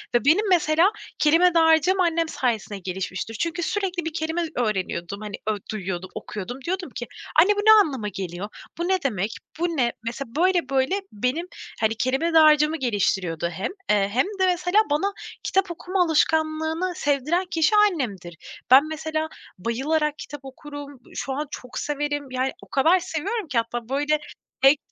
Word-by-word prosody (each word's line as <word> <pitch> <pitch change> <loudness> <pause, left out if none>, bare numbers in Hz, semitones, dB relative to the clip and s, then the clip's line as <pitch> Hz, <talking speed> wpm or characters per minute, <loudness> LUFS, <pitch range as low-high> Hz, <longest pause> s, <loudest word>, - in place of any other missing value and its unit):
ve 240 - +2
benim, 390 +7 +4
mesela, 340 +2 +4 0.3
kelime 330 +4 +5
dağarcığım 325 +3 +4
annem 335 -2 +2
sayesinde 220 -5 -2
gelişmiştir. 190 +4 -4
Çünkü 340 0 -1
sürekli 370 -5 -2
bir 325 - -3
kelime 325 +1 -1
öğreniyordum, 200 -4 -2
hani, 210 -1 -5
ö 215 -1 +1
duyuyordum, 185 -3 -4
okuyordum. 210 +5 -6
Diyordum 365 -3 -2
ki: 240 -2 -5 0.3
"Anne, 410 +4 +4
bu - - -2
ne 435 +1 +6
anlama 260 -8 -4
geliyor? 190 0 -5 0.3
Bu 340 +1 -2
ne 380 0 +3
demek? 210 -5 -1 0.3
Bu 345 - +2
ne?" 240 -2 +2
Mesela, 235 +2 -6
böyle 355 0 +2
böyle 270 +9 +1
benim, 255 - -2 0.3
hani, 220 0 +1
kelime 265 +9 0
dağarcığımı 310 0 +6
geliştiriyordu 190 - 0
hem, 180 - -4 0.2
eee, 200 -1 +3
hem 260 +7 +3
de, 375 - +4
mesela, 360 +3 +2
bana 390 +8 +1 0.3
kitap 380 -2 +1
okuma 360 +2 0
alışkanlığını 320 +2 +1
sevdiren 295 +6 0
kişi 330 +6 +3
annemdir. 235 - +1 0.3
Ben, 280 +4 +8
mesela, 315 0 -3 0.3
bayılarak 295 - 0
kitap 290 - -8
okurum. 290 +2 -10
Iıı, 285 -2 -8 0.2
şu 270 - -3
an 295 +2 -3
çok 250 -1 -8
severim, 290 -2 -3
yani, 260 +1 0
o - - -15
kadar 325 +7 +4
seviyorum 380 +5 -3
ki, 260 -5 -2
hatta 230 0 -2
böyle 290 +3 +1 0.4
tek 275 +2 +6
295 Hz, 160 wpm, -24 LUFS, 235-335 Hz, 0.4 s, Ben